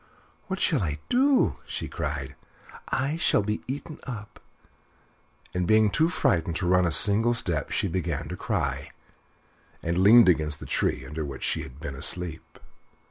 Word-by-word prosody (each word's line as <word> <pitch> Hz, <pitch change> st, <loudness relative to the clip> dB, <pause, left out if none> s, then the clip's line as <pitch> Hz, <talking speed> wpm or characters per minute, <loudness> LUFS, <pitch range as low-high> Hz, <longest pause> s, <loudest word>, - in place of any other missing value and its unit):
"What 190 Hz, -1 st, -3 dB
shall 150 Hz, -8 st, +1 dB
I 75 Hz, -5 st, -2 dB
do?" 265 Hz, +2 st, +3 dB
she -, -, -5 dB
cried; 70 Hz, 0 st, -4 dB, 0.6 s
"I 135 Hz, +6 st, -1 dB
shall 165 Hz, -, +2 dB
be 105 Hz, +1 st, -2 dB
eaten 145 Hz, +4 st, -6 dB
up," 105 Hz, -5 st, -8 dB, 1.1 s
and 90 Hz, -1 st, -1 dB
being 110 Hz, 0 st, +4 dB
too 160 Hz, -, +2 dB
frightened 90 Hz, -, 0 dB
to 90 Hz, -, -2 dB
run 90 Hz, 0 st, +3 dB
a -, -, 0 dB
single 110 Hz, +7 st, +5 dB
step, 85 Hz, -9 st, -1 dB
she -, -, -1 dB
began 90 Hz, -2 st, -3 dB
to -, -, -4 dB
cry, -, -, -3 dB, 0.9 s
and 85 Hz, +2 st, -1 dB
leaned 115 Hz, +4 st, +7 dB
against 75 Hz, -4 st, +2 dB
the -, -, -9 dB
tree 65 Hz, -, -1 dB
under 75 Hz, +4 st, -5 dB
which 70 Hz, -2 st, -7 dB
she -, -, +1 dB
had 65 Hz, +1 st, -11 dB
been 70 Hz, -3 st, -6 dB
asleep. 80 Hz, +4 st, -3 dB
95 Hz, 160 wpm, -26 LUFS, 80-120 Hz, 1.1 s, leaned